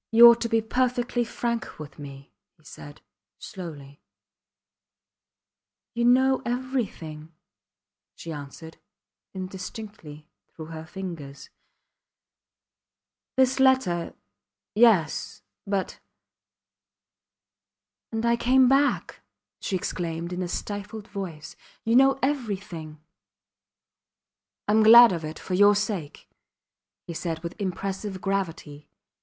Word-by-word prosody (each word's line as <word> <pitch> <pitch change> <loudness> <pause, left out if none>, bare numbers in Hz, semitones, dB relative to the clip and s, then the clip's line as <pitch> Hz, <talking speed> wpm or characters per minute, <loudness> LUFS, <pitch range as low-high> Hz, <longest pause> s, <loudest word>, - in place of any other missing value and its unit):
You 235 +1 +9
ought 235 0 +6
to 230 - -1
be 225 0 +2
perfectly 245 +1 0
frank 235 0 -3
with 150 -2 -10
me, 140 -1 -11 0.2
he 155 - -28
said, 145 0 -12 0.4
slowly. 145 -6 -9 1.9
You 235 0 0
know 260 +2 +4
everything, 225 - -4 0.8
she 165 - -8
answered, 150 +2 -9 0.6
indistinctly, 185 -4 -8 0.3
through 160 0 -9
her 160 0 -8
fingers. 155 -6 -8 1.9
This 260 0 +3
letter.... 260 -11 +2 0.6
Yes... 210 -8 +2 0.2
but... 195 -1 -2 2.1
And 225 0 -2
I 235 0 +3
came 255 +2 +4
back, 275 +2 +1 0.4
she 195 - -3
exclaimed 170 -1 -3
in 180 - -3
a 180 - -2
stifled 205 +3 -6
voice; 180 -7 -7 0.3
you 225 +1 +1
know 270 +1 +5
everything. 200 - -3 1.7
I - - +2
am 220 +1 +5
glad 235 +1 +9
of 170 -3 -3
it 155 +1 -6
for 185 - -6
your 205 +2 +6
sake, 200 -7 -3 0.8
he 170 - -6
said 165 0 -4
with 170 +1 -5
impressive 195 +1 -4
gravity. 165 -7 -4
195 Hz, 105 wpm, -26 LUFS, 160-235 Hz, 2.1 s, You